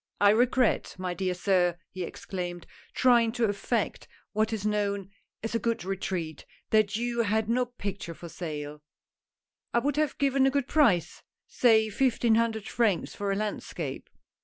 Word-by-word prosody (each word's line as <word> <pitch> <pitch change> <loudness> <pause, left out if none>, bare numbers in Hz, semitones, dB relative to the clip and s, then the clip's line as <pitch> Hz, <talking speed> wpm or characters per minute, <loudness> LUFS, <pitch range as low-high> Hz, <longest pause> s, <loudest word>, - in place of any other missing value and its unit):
"I 205 0 +6
regret, 245 +2 +2
my 185 -1 -3
dear 185 +1 -1
sir," 180 -2 +2
he 185 - -6
exclaimed, 175 -1 -5 0.3
trying 240 -3 +4
to 240 -1 +1
effect 205 -2 -1 0.3
what 215 +1 +1
is 215 -2 -3
known 200 -2 -1 0.3
as 225 - -3
a 230 - +1
good 230 -5 -1
retreat, 185 -5 -3
" - - -37
that 215 -1 +3
you 235 +1 0
had 220 0 +1
no 245 +2 +1
picture 200 -7 -6
for 170 - -9
sale: 150 -3 -6 0.9
I - - +5
would 285 +4 +1
have 305 -1 +1
given 275 -1 +3
a - - +5
good 275 -1 0
price 195 - +2
— - - -63
say 220 -3 +3
fifteen 240 -1 +2
hundred 220 -2 +1
francs 225 -7 +1
for 200 -1 -2
a - - +1
landscape." 210 0 -4
215 Hz, 165 wpm, -28 LUFS, 185-235 Hz, 0.9 s, I